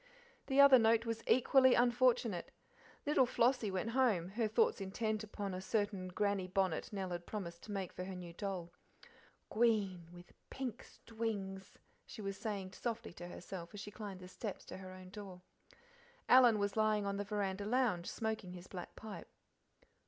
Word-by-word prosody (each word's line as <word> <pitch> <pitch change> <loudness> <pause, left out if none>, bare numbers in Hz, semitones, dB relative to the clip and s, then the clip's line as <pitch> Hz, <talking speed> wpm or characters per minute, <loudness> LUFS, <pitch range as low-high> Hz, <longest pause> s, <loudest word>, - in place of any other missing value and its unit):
The 270 0 +2
other 280 -2 +9
note 225 0 +4
was 230 -1 -2
equally 260 +1 +6
unfortunate. 240 -5 +2 0.6
Little 285 -3 +4
Flossie 240 -2 +2
went 190 +4 -2
home, 225 -9 +2
her 220 +3 0
thoughts 445 - +2
intent 215 +3 -2
upon 205 -2 -5
a 185 - -4
certain 205 -2 -1
Grannie 195 0 0
bonnet 185 -3 0
Nell 190 -3 -3
had 175 0 -5
promised 170 -5 -5
to 215 - -8
make 195 -3 -3
for 180 - -5
her 190 0 -6
new 175 -2 -8
doll. 180 -2 -4 0.8
"Gween 200 -7 +1
with 175 0 -14 0.2
pink 255 -4 -5
stwings," 200 -4 -5 0.3
she - - -10
was 195 0 -3
saying 195 -2 -4
softly 230 -2 -4
to 175 0 -8
herself 175 +1 -8
as - - -6
she 205 +1 -7
climbed 200 -3 -7
the 180 - -9
steps 200 +2 -6
to - - -8
her 190 -1 -9
own 185 0 -11
door. 195 -3 -9 0.8
Alan 245 -3 +7
was 200 -1 -1
lying 215 -1 +2
on 200 0 -1
the 205 - -1
veranda 200 -1 -2
lounge, 215 -7 +1
smoking 220 -5 -3
his 180 0 -9
black 180 -2 -8
pipe. 215 -2 -8
205 Hz, 170 wpm, -36 LUFS, 185-230 Hz, 0.8 s, other